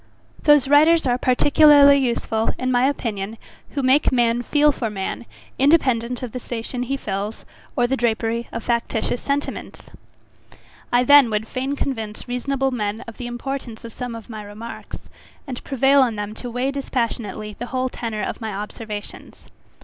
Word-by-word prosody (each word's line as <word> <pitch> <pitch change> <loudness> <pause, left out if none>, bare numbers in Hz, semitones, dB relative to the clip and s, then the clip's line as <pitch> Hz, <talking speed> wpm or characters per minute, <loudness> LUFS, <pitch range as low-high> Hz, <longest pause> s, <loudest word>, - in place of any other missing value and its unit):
Those 295 -3 +6
writers 310 +3 +5
are 250 -1 +1
particularly 285 +2 +6
useful, 235 -4 0
in 255 0 -1
my 245 +1 +3
opinion, 220 -5 -4 0.4
who 280 - -1
make 260 +3 +4
man 240 -1 +2
feel 295 +4 +3
for 240 -5 -3
man, 205 +3 -5 0.3
independent 255 -5 +2
of 245 - -5
the 250 - -5
station 240 +1 -4
he 270 +3 -2
fills, 205 -2 -4 0.3
or 245 -4 +2
the 260 +2 0
drapery 230 -1 -1
of 230 - -5
factitious 235 0 -1
sentiments. 285 +1 -4 1.0
I 245 +1 +4
then 285 -1 +7
would 215 0 -2
fain 265 +4 -3
convince 225 -7 -4
reasonable 270 +2 -1
men 215 -3 -2
of 230 - -10
the 245 - -5
importance 240 -1 -6
of 230 - -9
some 245 -2 -5
of 225 -2 -10
my 220 -2 -7
remarks 210 +3 -9 0.5
and 255 -4 -7
prevail 270 +1 +3
on 240 -4 +2
them 205 0 -4
to 245 +2 -7
weigh 250 +3 -1
dispassionately 230 -6 -3
the 245 - -4
whole 255 0 -1
tenor 225 -4 -4
of - - -4
my 220 -1 -3
observations. 210 +1 -7
245 Hz, 165 wpm, -22 LUFS, 225-270 Hz, 1.0 s, then